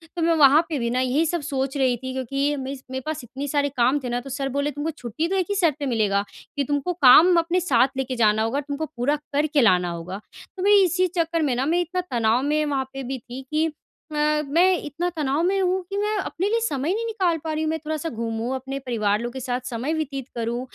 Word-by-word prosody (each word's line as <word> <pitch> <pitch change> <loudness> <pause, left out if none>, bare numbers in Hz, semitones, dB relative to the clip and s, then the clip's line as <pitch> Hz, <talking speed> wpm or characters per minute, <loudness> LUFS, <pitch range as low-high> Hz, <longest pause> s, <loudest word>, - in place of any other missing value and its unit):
तो 340 - -3
मैं 335 0 +3
वहाँ 290 +2 +7
पे 310 - -1
भी 235 -1 -1
ना 250 +1 0
यही 260 +5 +1
सब 340 +1 -1
सोच 275 -2 -2
रही 260 -2 +2
थी 260 +2 -6
क्योंकि 275 +3 -1
मेस 265 0 -6
मेरे 260 0 -3
पास 310 -3 -4
इतने 260 +4 -6
सारे 285 0 +1
काम 260 +1 +2
थे 250 - -3
ना, 240 - -1
तो 275 - -10
सर 270 +1 -2
बोले 285 +2 -1
तुमको 290 +3 -3
छुट्टी 305 +2 -3
तो 385 - -1
एक 375 -2 +1
ही 405 - 0
शर्त 335 -7 +2
पे 285 - -2
मिलेगा 210 -6 +1 0.3
कि 285 - 0
तुमको 290 +5 -1
काम 330 +3 +7
अपने 340 +2 +1
साथ 265 -7 +3
लेके 260 -1 -2
जाना 220 -2 +3
होगा, 245 +6 0
तुमको 290 +2 -4
पूरा 285 0 -1 0.2
करके 290 -1 +2
लाना 180 -5 +4
होगा। 170 +3 -6 0.4
तो 370 - -3
मैं 410 - +4
इसी 365 +1 +2
चक्कर 330 0 +1
में 275 -5 +1
ना, 260 +2 0
मैं 335 +3 +2
इतना 360 +2 -2
तनाव 230 0 +2
में 300 +1 +1
वहाँ 275 -2 -1
पे 270 - -5
भी 265 +1 -4
थी 245 +3 -9
कि 310 +1 +2 0.5
अ, - - -5 0.3
मैं 345 +7 +4
इतना 335 +5 -2
तनाव 290 0 0
में 385 +2 +2
हूँ 370 +1 +1
कि 395 - -3
मैं 420 +1 0
अपने 380 -1 -2
लिए 460 +1 +2
समय 290 +6 -1
नहीं 460 +2 -2
निकाल 370 -7 0
पा 320 - -3
रही 310 +1 -1
हूँ। 310 - 0
मैं 320 0 -1
थोड़ा-सा 315 +1 -3
घूमूँ 230 +2 -3
अपने 270 +1 -5
परिवार 215 -6 0
लोग 240 +1 -4
के 265 - -5
साथ 250 0 -2
समय 255 +6 -2
व्यतीत 275 -4 -3
करूँ 235 +1 -2
280 Hz, 250 wpm, -23 LUFS, 250-325 Hz, 0.5 s, वहाँ